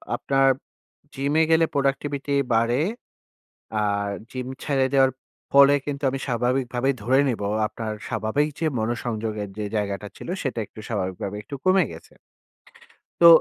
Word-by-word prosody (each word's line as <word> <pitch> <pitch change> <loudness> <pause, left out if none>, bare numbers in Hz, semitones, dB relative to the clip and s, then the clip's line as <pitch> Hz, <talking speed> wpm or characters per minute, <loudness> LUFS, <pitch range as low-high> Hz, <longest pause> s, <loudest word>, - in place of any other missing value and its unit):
আপনার 135 0 +2 0.7
জিমে 145 +4 +2
গেলে 165 0 +5
প্রোডাক্টিভিটি 140 0 0 0.2
বাড়ে। 120 +4 +2 1.0
আর 100 0 0 0.2
জিম 130 -1 -4 0.2
ছাইড়ে 135 -2 +2
দেওয়ার 135 -1 +5 0.4
ফলে 140 0 +8
কিন্তু 145 -1 -4
আমি 135 - -3
স্বাভাবিকভাবেই 125 +1 0
ধরে 130 +4 +4
নিবো। 105 -4 -1 0.2
আপনার 110 0 -5 0.2
স্বাভাবিক 115 +6 0
যে 165 - 0
মনোসংযোগের 110 -2 -2
যে 105 - -2
জায়গাটা 100 0 -2
ছিল - - -9 0.2
সেটা 130 -5 -2
একটু - - -14
স্বাভাবিকভাবে 95 -1 -3
একটু 125 - -7
কমে 185 -1 +5
গেছে। 80 - -13 1.1
তো 170 - +10
125 Hz, 130 wpm, -24 LUFS, 110-140 Hz, 1.1 s, তো